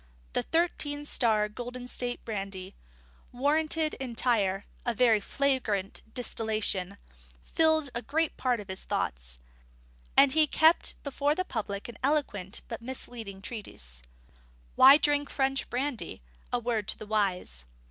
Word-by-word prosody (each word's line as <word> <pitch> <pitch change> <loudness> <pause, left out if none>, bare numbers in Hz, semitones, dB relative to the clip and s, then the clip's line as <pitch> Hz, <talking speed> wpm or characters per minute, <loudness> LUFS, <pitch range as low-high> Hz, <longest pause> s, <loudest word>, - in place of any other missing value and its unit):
The - - +2
Thirteen 295 - -1
Star 220 -7 +3
Golden 245 +3 -7
State 245 -1 -2
Brandy, 195 -3 -5 0.6
Warranted 310 +4 +1
Entire 230 -6 +1 0.2
(a 240 -1 -1
very 230 -2 +5
flagrant 215 -5 -1
distillation) 215 -5 -1 0.5
filled 315 -3 +2
a 235 - -3
great 320 +4 0
part 250 -3 0
of 205 - -8
his 190 -1 -5
thoughts, - - -2 0.8
and 275 -1 +7
was 310 -1 +5
kept 320 +2 +4
before 285 +1 0
the 370 - -1
public 200 - -4
in 235 -2 -9
an - - -30
eloquent 260 -10 -1
but 230 - -6
misleading 230 -5 -7
treatise: 65 - -6 0.7
_Why 275 +3 +9
Drink 290 -1 +2
French 270 0 0
Brandy? 250 - -3 0.3
A - - +2
Word 230 -3 -1
to - - +1
the - - -8
Wise. 185 - 0
240 Hz, 135 wpm, -29 LUFS, 205-280 Hz, 0.8 s, Why